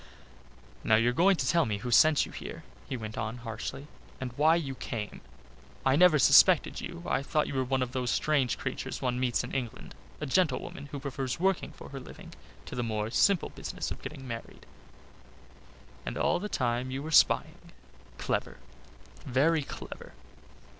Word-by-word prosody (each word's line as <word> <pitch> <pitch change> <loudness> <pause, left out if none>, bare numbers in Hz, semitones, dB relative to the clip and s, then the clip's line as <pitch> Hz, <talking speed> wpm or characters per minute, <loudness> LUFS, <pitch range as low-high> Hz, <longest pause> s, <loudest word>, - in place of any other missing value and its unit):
"Now 110 - +4
you're 115 +2 +3
going 190 +8 +4
to 135 -6 -2
tell 165 +1 +3
me 105 -2 -1
who 120 +4 -5
sent 155 +5 +6
you - - -11
here," - - -8 0.3
he 130 - -2
went 110 -2 -6
on 110 +3 -3
harshly, 115 +4 -6 0.3
"and 125 -2 -5
why 155 +4 +5
you 145 -6 -2
came. 110 -4 -6 0.6
I 135 0 +4
never 175 0 +6
suspected 135 - +6
you. 85 - -7
I - - 0
thought 150 +2 0
you - - -5
were 130 -1 +1
one 130 0 0
of 125 - -5
those 125 -1 -2
strange 145 -3 +1
creatures - - -4
one 125 -1 -1
meets 125 -2 +1
in 125 - -7
England, 130 -2 -4 0.3
a 150 - -3
gentlewoman 145 -2 0
who 140 0 -6
prefers 135 -1 -4
working 190 0 +1
for - - -11
her 135 - -7
living 130 - -12 0.3
to - - -9
the 125 - -2
more 110 -1 -2
simple 190 +7 +3
business - - -5
of - - -6
getting 135 -4 -8
married. 115 -1 -8 1.4
And - - -5
all - - +2
the 210 +3 -4
time 125 -3 -1
you 135 +2 -4
were 160 - -5
spying - - +3 0.5
clever - - -2 0.7
very 150 +6 +3
clever!" 135 - -9
130 Hz, 175 wpm, -29 LUFS, 120-150 Hz, 1.4 s, sent